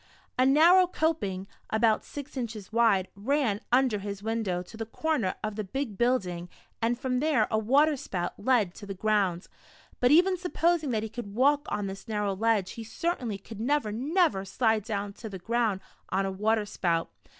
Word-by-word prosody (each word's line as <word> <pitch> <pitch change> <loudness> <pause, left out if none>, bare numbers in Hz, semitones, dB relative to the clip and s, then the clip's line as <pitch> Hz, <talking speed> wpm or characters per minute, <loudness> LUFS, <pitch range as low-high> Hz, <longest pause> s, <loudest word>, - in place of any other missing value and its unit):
109 255 +1 +4
A - - +5
narrow 350 +5 +6
coping, 250 - -1 0.2
about 220 0 +2
six 285 0 -9
inches 220 -5 -5
wide, 225 -5 +3
ran 225 -1 0
under 250 -4 +3
his 200 0 -6
window, 215 -5 -1
to 205 - -13
the 225 - -4
corner 260 -7 -1
of 215 -1 -3
the 215 - -3
bie 265 +9 -2
build 240 0 +1
o - - -4
ing, 175 +1 -9 0.3
and 235 +1 +1
from 255 -1 -1
there 285 -6 +2
a 220 - +2
water 285 +8 +4
spout 180 -9 -4
led 220 -8 +2
to 205 - -11
the 195 - -5
ground; 195 -3 +1 0.5
but 245 - +4
even 360 +6 +5
supposing 340 -3 +1
that 220 -3 0
he - - -2
could 210 -3 -7
walk 285 +4 +3
on 205 - -2
this 195 +3 -7
narrow 210 -2 -1
ledge, 210 -2 +1
he 230 - -7
certainly 230 - -2
could 210 +2 -11
never, 265 -1 0
never 265 - +1
slide 220 +2 +1
down 205 -2 -3
to 220 +2 -8
the 195 - -6
ground 220 0 0 0.3
on 195 +1 0
a 195 - -2
water 215 +2 +1
spout. 170 -5 -1
225 Hz, 195 wpm, -28 LUFS, 200-265 Hz, 0.5 s, narrow